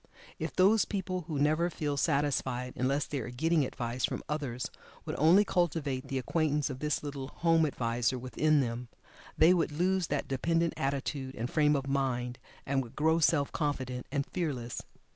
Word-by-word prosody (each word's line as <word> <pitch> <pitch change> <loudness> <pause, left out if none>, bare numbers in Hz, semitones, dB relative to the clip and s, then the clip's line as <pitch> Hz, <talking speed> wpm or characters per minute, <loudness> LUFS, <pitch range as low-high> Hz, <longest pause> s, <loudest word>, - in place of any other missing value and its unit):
If - - -4
those 200 +4 +5
people 185 -3 -3
who 155 - -3
never 155 +4 +2
feel 150 -4 -2
satisfied 140 -4 0
unless 135 +3 +1
they 145 - -3
are 120 - -5
getting 160 +5 +1
"advice" 125 -1 -4
from - - -1
others 140 -5 -3 0.3
would - - -3
only 175 +8 +6
cultivate 155 -8 0
the 135 - -2
acquaintance 150 +1 0
of 130 - -7
this 150 0 -1
little 140 -2 -5
"home 165 +1 +2
adviser" 120 -1 0
within 140 +5 +2
them, 120 -1 -3 0.5
they 165 +3 +7
would 165 -4 +1
lose 180 +3 +1
that 145 -1 -2
dependent 165 +5 +1
attitude 135 -1 -2
and 120 +3 -4
frame 150 -1 +3
of 135 -1 -1
mind, 130 -3 -1 0.3
and 135 0 +1
would 120 -3 -10
grow 160 +2 +3
self 150 -3 +3
confident 130 -5 -2
and 140 -1 0
fearless. 135 -10 -3
145 Hz, 170 wpm, -31 LUFS, 130-160 Hz, 0.5 s, they